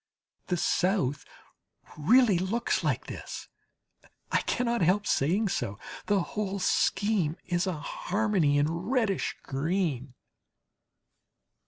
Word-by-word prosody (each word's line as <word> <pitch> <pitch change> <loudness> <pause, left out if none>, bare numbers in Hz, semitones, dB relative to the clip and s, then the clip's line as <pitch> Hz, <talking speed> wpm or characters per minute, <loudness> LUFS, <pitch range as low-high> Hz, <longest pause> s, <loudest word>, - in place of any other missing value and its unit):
The 180 - 0
South 175 -6 +1 0.7
really 210 - +4
looks 220 +6 0
like - - 0
this, - - -7 0.8
I - - +3
cannot 235 -2 0
help 190 +5 +3
saying 185 +8 +1
so. 110 - -2 0.3
The 205 -2 +3
whole 200 +1 -3
scheme 190 -3 +1
is 175 +1 0
a 185 - 0
harmony 180 -2 0
in 145 +1 +3
reddish 200 +3 -1
green. 140 -3 -2
185 Hz, 105 wpm, -28 LUFS, 155-210 Hz, 0.8 s, really